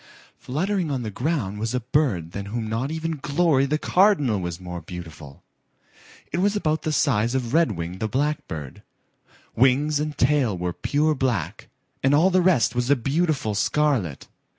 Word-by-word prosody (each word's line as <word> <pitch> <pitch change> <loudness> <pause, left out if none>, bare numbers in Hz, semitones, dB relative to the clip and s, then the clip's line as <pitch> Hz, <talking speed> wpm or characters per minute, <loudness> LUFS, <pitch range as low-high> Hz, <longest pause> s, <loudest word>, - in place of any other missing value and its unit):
Fluttering 180 +5 -1
on 130 -4 -2
the 110 - -4
ground 125 - -2
was 115 +3 -2
a - - +1
bird 115 - 0
than 100 +1 -6
whom 110 +1 -3
not 115 +5 -2
even 160 -1 -3
Glory 145 -2 +2
the 150 +2 +1
Cardinal 155 - +3
was 85 -1 -4
more 90 -1 -7
beautiful. 80 -4 -10 0.9
It 170 - -1
was 205 +2 +2
about 155 -6 0
the 155 - -2
size 120 -5 +1
of 125 -2 -2
Redwing 95 - 0
the 110 - -1
Blackbird. 130 - -3 0.7
Wings 140 +5 +3
and 150 0 -3
tail 125 -7 +2
were 90 0 -2
pure 150 - +1
black 125 - -2 0.3
and 135 +2 +3
all 175 +6 +4
the 185 0 +4
rest 145 -11 +3
was 125 +1 -1
a 145 - +6
beautiful 140 -2 0
scarlet. 110 - 0
130 Hz, 165 wpm, -24 LUFS, 105-155 Hz, 0.9 s, a